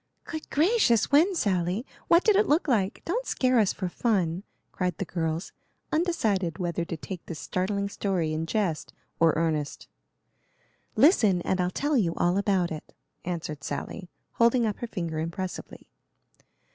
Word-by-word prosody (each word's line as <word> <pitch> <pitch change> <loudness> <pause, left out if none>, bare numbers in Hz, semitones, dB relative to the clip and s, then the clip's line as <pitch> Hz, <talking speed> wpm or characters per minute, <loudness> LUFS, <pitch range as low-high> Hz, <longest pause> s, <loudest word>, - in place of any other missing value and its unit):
"Good 315 -2 -7
gracious! 305 - +3
When, 335 +7 +5
Sally?" 190 - 0 0.2
"What 340 +1 +5
did 430 - +4
it 410 +1 +4
look 310 +4 +2
like?" 210 -7 0
"Don't 480 +9 -2
scare 255 -2 +2
us 205 -4 +3
for 185 - -3
fun," 180 -4 0 0.3
cried 180 -3 -2
the - - -3
girls, 165 0 -3 0.4
undecided 215 - 0
whether 170 -1 -2
to 165 -1 -5
take 180 +2 -7
this 165 - -5
startling 195 +6 -1
story 185 -6 -1
in 160 +1 -2
jest 180 -4 -1 0.3
or 165 -1 +5
earnest. 155 -3 -1 1.1
"Listen, 220 - +5
and 185 -1 0
I'll 180 - +1
tell 290 +10 -1
you 170 -8 +1
all 175 +3 +2
about 190 -4 +1
it," 155 -1 -8 0.3
answered 160 -5 -4
Sally, 175 +6 -5 0.2
holding 235 +1 +3
up 210 -2 -2
her 240 - -4
finger 170 -7 -3
impressively. 170 +3 -5
190 Hz, 155 wpm, -27 LUFS, 170-240 Hz, 1.1 s, When